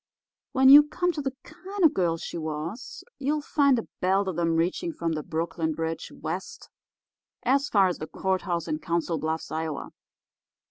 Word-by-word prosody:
When 265 Hz, 0 st, +6 dB
you 285 Hz, +2 st, +12 dB
come 355 Hz, +4 st, -1 dB
to 310 Hz, -, -4 dB
the 270 Hz, -1 st, -3 dB
kind 370 Hz, +5 st, -6 dB
of 320 Hz, -, +7 dB
a -, -, -15 dB
girl 170 Hz, -3 st, +1 dB
she -, -, -7 dB
was, 160 Hz, +9 st, -5 dB, 0.2 s
you'll 290 Hz, +2 st, -1 dB
find 280 Hz, -4 st, +3 dB
a 230 Hz, -, -4 dB
belt 190 Hz, +2 st, +2 dB
of 175 Hz, -3 st, -2 dB
'em 165 Hz, -1 st, +1 dB
reaching 180 Hz, -, 0 dB
from 170 Hz, -, -3 dB
the 155 Hz, -1 st, -2 dB
Brooklyn 160 Hz, +1 st, -2 dB
Bridge 165 Hz, +1 st, -4 dB
west 460 Hz, 0 st, -6 dB, 0.7 s
as 275 Hz, +3 st, +2 dB
far 195 Hz, -3 st, +4 dB
as 180 Hz, -, -3 dB
the 155 Hz, -, -5 dB
courthouse 185 Hz, -2 st, -2 dB
in 155 Hz, -, -2 dB
Council 170 Hz, -1 st, -1 dB
Bluffs, 160 Hz, +2 st, -3 dB
Ia. 155 Hz, -2 st, -3 dB
185 Hz, 180 wpm, -26 LUFS, -, 0.7 s, you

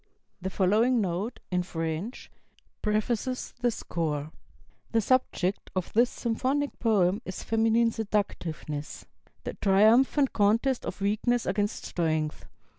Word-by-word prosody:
The 190 Hz, -, -2 dB
following 215 Hz, +7 st, +3 dB
note, 195 Hz, +3 st, -2 dB
in 180 Hz, 0 st, +2 dB
French, 165 Hz, +5 st, -4 dB, 0.5 s
prefaces 225 Hz, +4 st, -1 dB
the 245 Hz, -, +3 dB
score: 155 Hz, -8 st, -3 dB, 0.6 s
"The 225 Hz, -, +4 dB
subject 205 Hz, -5 st, 0 dB
of 185 Hz, -2 st, -2 dB
this 240 Hz, +2 st, +4 dB
symphonic 265 Hz, +5 st, -1 dB
poem 205 Hz, -3 st, +2 dB
is 185 Hz, -, -6 dB
feminine 225 Hz, +1 st, +3 dB
seductiveness, 175 Hz, -9 st, -3 dB, 0.4 s
the -, -, -4 dB
triumphant 230 Hz, +8 st, +4 dB
contest 225 Hz, +5 st, +2 dB
of -, -, -6 dB
weakness 220 Hz, +4 st, +1 dB
against 205 Hz, +1 st, -1 dB
strength. 155 Hz, -3 st, -1 dB
210 Hz, 115 wpm, -28 LUFS, 180-235 Hz, 0.6 s, The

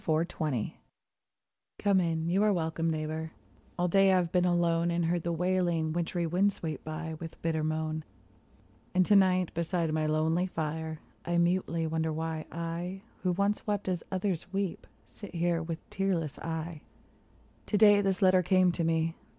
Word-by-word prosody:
THE -, -, -1 dB
LAST 160 Hz, +2 st, +1 dB
OF 155 Hz, -, +2 dB
SIX 110 Hz, -, -1 dB, 1.1 s
Come 200 Hz, -2 st, +3 dB
in; 165 Hz, -2 st, 0 dB
you 185 Hz, +4 st, +2 dB
are 210 Hz, 0 st, +4 dB
welcome, 165 Hz, -2 st, 0 dB
neighbor; 155 Hz, 0 st, -3 dB, 0.4 s
all 175 Hz, 0 st, +1 dB
day 195 Hz, +2 st, +5 dB
I've 180 Hz, -2 st, +2 dB
been 180 Hz, -1 st, +3 dB
alone, 170 Hz, -1 st, +2 dB
And 170 Hz, 0 st, 0 dB
heard 170 Hz, +1 st, +1 dB
the 170 Hz, -, -2 dB
wailing, 175 Hz, -2 st, +1 dB
wintry 175 Hz, 0 st, -1 dB
wind 185 Hz, +5 st, +2 dB
sweep 160 Hz, -4 st, -5 dB
by 160 Hz, +1 st, -5 dB
with 165 Hz, -1 st, -8 dB
bitter 160 Hz, -1 st, 0 dB
moan; 155 Hz, 0 st, -2 dB, 0.9 s
And 185 Hz, 0 st, +5 dB
to 205 Hz, -, +4 dB
night 185 Hz, -2 st, +4 dB
beside 170 Hz, -1 st, -1 dB
my 155 Hz, -1 st, +1 dB
lonely 160 Hz, +4 st, +1 dB
fire, 160 Hz, -1 st, -4 dB, 0.2 s
I 175 Hz, 0 st, 0 dB
mutely 170 Hz, -1 st, +1 dB
wonder 160 Hz, 0 st, -1 dB
why 160 Hz, 0 st, -3 dB
I, 170 Hz, +3 st, -4 dB, 0.2 s
who 180 Hz, -1 st, +1 dB
once 200 Hz, +4 st, 0 dB
wept 205 Hz, -1 st, -1 dB
as 180 Hz, -3 st, -1 dB
others 185 Hz, -2 st, -2 dB
weep, 195 Hz, -3 st, -3 dB, 0.2 s
sit 205 Hz, -4 st, -11 dB
here 170 Hz, 0 st, +1 dB
with 165 Hz, 0 st, -6 dB
tearless 180 Hz, -6 st, -1 dB
eye. 160 Hz, -1 st, -4 dB, 0.9 s
To 210 Hz, -, +1 dB
day 205 Hz, -1 st, +7 dB
this 195 Hz, -1 st, 0 dB
letter 185 Hz, -1 st, +6 dB
came 185 Hz, 0 st, +4 dB
to 170 Hz, 0 st, -2 dB
me. 165 Hz, 0 st, +1 dB
170 Hz, 175 wpm, -30 LUFS, 160-185 Hz, 1.1 s, day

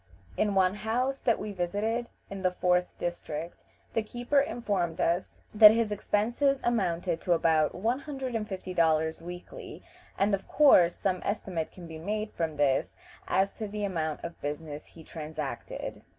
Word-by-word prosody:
In 205 Hz, -2 st, +1 dB
one 190 Hz, -1 st, +4 dB
house 240 Hz, +6 st, -1 dB
that 235 Hz, -, +2 dB
we 210 Hz, -, -5 dB
visited, 205 Hz, +6 st, -1 dB, 0.2 s
in 195 Hz, -1 st, -7 dB
the 185 Hz, -, +3 dB
fourth 180 Hz, 0 st, +1 dB
district, 170 Hz, -1 st, -5 dB, 0.3 s
the 225 Hz, -, +2 dB
keeper 240 Hz, +6 st, 0 dB
informed 200 Hz, -, -1 dB
us 170 Hz, +2 st, 0 dB
that 210 Hz, 0 st, +10 dB
his 225 Hz, 0 st, +1 dB
expenses 235 Hz, +7 st, +1 dB
amounted 180 Hz, -7 st, 0 dB
to 175 Hz, -, +2 dB
about 160 Hz, -2 st, +2 dB
one 230 Hz, +8 st, 0 dB
hundred 270 Hz, -3 st, -5 dB
and 215 Hz, -2 st, -2 dB
fifty 185 Hz, -1 st, -5 dB
dollars 160 Hz, -2 st, +2 dB
weekly, 375 Hz, -, -9 dB, 0.3 s
and 200 Hz, +1 st, +2 dB
of 195 Hz, -1 st, -1 dB
course 180 Hz, -, +6 dB
some 185 Hz, -2 st, -1 dB
estimate 185 Hz, -5 st, -2 dB
can 180 Hz, -, -11 dB
be 160 Hz, -1 st, -8 dB
made 210 Hz, +5 st, -3 dB
from 160 Hz, -3 st, -3 dB
this 140 Hz, -2 st, +1 dB, 0.3 s
as 195 Hz, +1 st, +2 dB
to 220 Hz, -, -5 dB
the 210 Hz, +1 st, -4 dB
amount 160 Hz, -5 st, -2 dB
of 170 Hz, 0 st, -7 dB
business 150 Hz, 0 st, -5 dB
he 165 Hz, -, -14 dB
transacted. 155 Hz, -5 st, -6 dB
190 Hz, 165 wpm, -29 LUFS, 165-220 Hz, 0.3 s, that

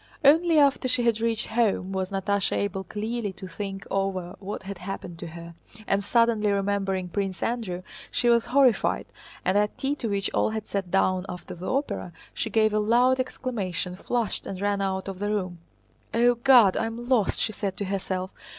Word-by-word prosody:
Only 325 Hz, +3 st, +6 dB
after 280 Hz, -2 st, +4 dB
she 250 Hz, -1 st, +2 dB
had 230 Hz, -2 st, +2 dB
reached 230 Hz, -1 st, +1 dB
home 220 Hz, -4 st, +1 dB
was 190 Hz, -1 st, -2 dB
Natásha 200 Hz, 0 st, 0 dB
able 195 Hz, -1 st, -2 dB
clearly 215 Hz, +3 st, -3 dB
to 190 Hz, -, -9 dB
think 195 Hz, +2 st, -6 dB
over 190 Hz, -2 st, -1 dB
what 200 Hz, 0 st, -6 dB
had 195 Hz, -1 st, -7 dB
happened 180 Hz, -2 st, -6 dB
to 170 Hz, -, -6 dB
her, 170 Hz, +1 st, -9 dB, 0.3 s
and 200 Hz, 0 st, +1 dB
suddenly 230 Hz, -2 st, +3 dB
remembering 195 Hz, -2 st, 0 dB
Prince 195 Hz, +1 st, -3 dB
Andrew 210 Hz, -7 st, -2 dB, 0.3 s
she 240 Hz, -, 0 dB
was 235 Hz, -1 st, +4 dB
horrified, 260 Hz, -3 st, +3 dB, 0.4 s
and 190 Hz, +2 st, +3 dB
at 210 Hz, 0 st, 0 dB
tea 275 Hz, +1 st, 0 dB
to 230 Hz, -, -3 dB
which 200 Hz, -1 st, -1 dB
all -, -, +2 dB
had 220 Hz, -1 st, -4 dB
sat 195 Hz, -3 st, -3 dB
down 185 Hz, 0 st, +2 dB
after 180 Hz, -1 st, -7 dB
the 175 Hz, +2 st, -6 dB
opera, 265 Hz, -, -2 dB, 0.2 s
she 225 Hz, -, -2 dB
gave 215 Hz, 0 st, +3 dB
a 215 Hz, -, +2 dB
loud 245 Hz, +5 st, +3 dB
exclamation, 210 Hz, -9 st, -3 dB
flushed, 235 Hz, +2 st, -2 dB
and 190 Hz, -, -5 dB
ran 200 Hz, 0 st, 0 dB
out 190 Hz, 0 st, -2 dB
of 195 Hz, -1 st, -5 dB
the 205 Hz, +1 st, -1 dB
room. 185 Hz, -4 st, -2 dB, 0.6 s
"O 240 Hz, +1 st, +5 dB
God! 240 Hz, -5 st, +6 dB
I 225 Hz, -, 0 dB
am 235 Hz, +1 st, -6 dB
lost!" 245 Hz, -6 st, +2 dB
she 220 Hz, -, 0 dB
said 195 Hz, -3 st, -3 dB
to 200 Hz, -, -2 dB
herself. 190 Hz, -1 st, -3 dB
200 Hz, 190 wpm, -26 LUFS, 190-235 Hz, 0.6 s, Only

